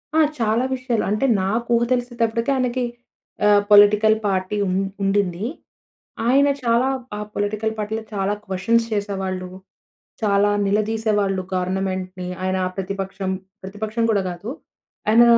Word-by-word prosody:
ఆ! - - +5 0.2
చాలా 225 +1 +2
విషయాలు 250 -4 -1
అంటే 215 +6 +1 0.2
నాకు 220 +5 -1
ఊహ 235 - +3
తెలిసేతప్పటికి 235 -1 -1
ఆయనకి 255 -1 0 0.6
ఆహ్, 205 -1 +6
పొలిటికల్ 210 +1 +7
పార్టీ 190 +1 -1
ఉన్ 185 +1 0 0.3
ఉండింది. 195 -1 0 0.8
ఆయన 280 +3 +5
చాలా 235 +2 +3 0.3
ఆహ్, 210 - -4
పొలిటికల్ 215 +2 -1
పార్టీలో 220 +1 -3
చాలా 195 0 0
క్వెశ్చన్స్ 215 +4 +1
చేసేవాళ్ళు. 190 -3 -3 0.7
చాలా 205 0 +3 0.2
నిలదీసే 215 +2 +1
వాళ్ళు 195 -2 0
గవర్నమెంట్‌ని. 185 0 -2 0.2
ఆయన 185 0 0 0.2
ప్రతిపక్షం, 195 0 -3 0.3
ప్రతిపక్షం 215 +4 -3
గూడా 200 -3 +1
కాదు. 180 +6 -6 0.6
ఆయన 230 +2 +7
205 Hz, 120 wpm, -22 LUFS, 190-225 Hz, 0.8 s, పొలిటికల్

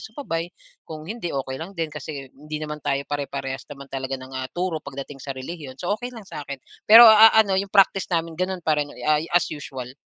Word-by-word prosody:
sumabay, 175 - -4 0.4
kung 155 -1 -8
hindi, 210 +1 -5
okey 135 +1 -4
lang 190 +4 -8
din, 165 -2 -3
kasi 140 -2 -7
hindi 150 +2 -7
naman 150 -1 -6
tayo 140 -1 -1
pare-parehas 140 -2 -4
naman 140 -1 -9
talaga 135 0 -3
ng, 130 0 -12
ah, 130 0 -4
turo 175 -3 -2
pagdating 140 0 -8
sa 135 -2 -6
relihiyon. 135 -1 -8
So, 200 - -1
okey 245 +3 -6
lang 225 -4 -11
sa 185 - -8
akin, 140 -1 -6 0.3
pero, 225 +3 +11
ah, 220 0 +8
ano 210 -3 +5
'yong 195 +1 -1
practice 195 -1 +3
namin, 165 -2 -1
gano'n 185 0 -3
pa 150 -2 +2
rin, 145 - -3 0.2
ah, 150 0 +3 0.2
as - - +4
usual. 130 -4 -7
150 Hz, 215 wpm, -23 LUFS, 140-185 Hz, 0.4 s, pero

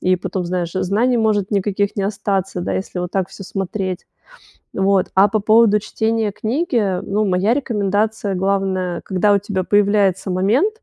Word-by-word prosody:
и 185 0 +2
потом, 180 0 -4
знаешь, 175 -1 -3
знаний 205 +7 +1
может 215 -3 +1
никаких 200 0 0
не 200 - -1
остаться, 195 - -2
да, 95 +2 -3
если 95 - -4
вот 180 0 -4
так 190 -2 -1
всё 195 - -10
смотреть. 190 -1 -4 0.7
Вот, 195 -1 +2
а 195 +2 +5
по 215 +1 0
поводу 215 0 +4
чтения 220 0 -1
книги, 220 - -1
ну, 210 +2 -1
моя 190 +5 +2
рекомендация 210 -4 -1
главная, 190 -1 -1
когда 195 +2 +2
у 200 - +4
тебя 195 -2 -3
появляется 200 -2 +2
момент, 250 - +1
200 Hz, 160 wpm, -19 LUFS, 185-215 Hz, 0.7 s, а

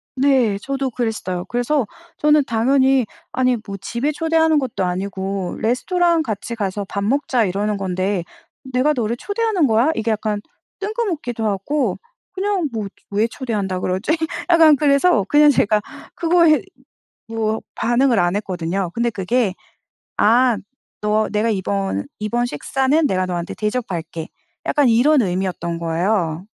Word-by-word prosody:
네 260 -6 +3
저도 275 -1 -2
그랬어요. 215 -7 -3
그래서 245 +2 0 0.3
저는 300 -1 +4
당연히 260 +2 +3 0.3
아니 255 -1 +2
뭐 200 -1 -6
집에 235 +9 -2
초대하는 320 -1 +2
것도 250 -7 -2
아니고 190 0 -3
"레스토랑 335 - +2
같이 225 0 -4
가서 205 -1 -2
밥 200 - -3
먹자." 250 0 +1
이러는 205 +3 -1
건데 185 -1 -1 0.4
"내가 260 +3 +1
너를 235 -3 -1
초대하는 405 - 0
거야." 230 +7 +3
이게 225 0 0
약간 215 -1 -1 0.4
뜬금없기도 370 - -2
하고 210 +9 -1 0.4
그냥 380 -4 0
뭐 215 -3 -3 0.2
'왜 210 +3 +2
초대한다고 205 -7 -3
그러지?' 190 +10 -1 0.4
약간 320 -3 +7
그래서 280 - +3
그냥 295 0 +6
제가 215 -5 +2 0.3
그거에 335 -2 +4 0.7
뭐 225 -1 -1 0.2
반응을 240 -2 +2
안 175 +2 +1
했거든요. 185 -2 -2
근데 235 0 0
그게 210 +1 0 0.6
"아 240 +1 +4 0.4
너 210 +1 +1
내가 215 +2 +1
이번 100 - -1
이번 235 +3 0
식사는 270 +5 +1
내가 185 0 0
너한테 175 -2 -4
대접할게." 175 -8 -3 0.4
약간 290 -4 +3
이런 255 +5 +4
의미였던 180 -2 -2
거예요. 170 +1 -1
225 Hz, 300 characters per minute, -20 LUFS, 195-275 Hz, 0.7 s, 약간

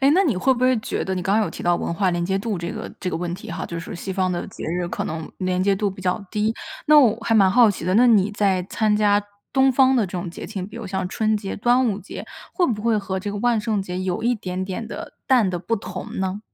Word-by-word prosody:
哎， 275 +1 +5
那 385 - +5
你 260 - +2
会 265 +8 +3
不 245 - -6
会 255 0 +4
觉 - - -3
得 190 - -2
你 180 - -3
刚 195 +3 +1
刚 220 - +3
有 - - -4
提 - - -8
到 175 0 +3
文 170 - -3
化 185 +1 +1
连 175 0 -1
接 190 +2 0
度 205 0 -2
这 170 0 -4
个 220 0 -6
这 185 - -2
个 - - -2
问 175 0 -3
题 - - -9
哈， 170 - -4
就 170 - -5
是 190 +5 -7
西 180 +2 -6
方 185 -1 0
的 175 - -3
节 - - -9
日 175 +2 -2
可 - - -3
能 160 0 -5
连 185 0 0
接 200 0 +3
度 200 0 0
比 190 - -10
较 185 +2 -1
低。 215 +1 0 0.3
那 300 0 +8
我 230 -6 +5
还 225 0 0
蛮 195 -3 +5
好 235 +1 +6
奇 175 -4 -6
的， 185 - +1
那 245 +4 +6
你 210 -3 +4
在 195 -3 +1
参 215 -2 +2
加 205 -1 +3 0.3
东 265 0 +4
方 265 +1 +4
的 230 -6 +2
这 180 - -12
种 175 -1 -4
节 - - -8
庆， 190 -2 -5
比 225 - -11
如 230 - -6
像 190 -1 -2
春 215 +2 +1
节、 200 -2 -4
端 245 +4 +3
午 195 - -3
节， - - -8 0.3
会 360 - +3
不 215 -4 -1
会 230 -1 +2
和 200 -2 -2
这 205 +2 -4
个 205 - -5
万 235 0 +2
圣 215 -2 0
节 180 -1 -5
有 185 +1 -2
一 240 +2 +2
点 185 -4 -4
点 195 +4 -5
地 - - -7
淡 250 -7 +4
得 175 - -2
不 225 +7 -1
同 215 +1 -7
呢？ 190 +2 -2
200 Hz, 315 characters per minute, -22 LUFS, 185-225 Hz, 0.3 s, 那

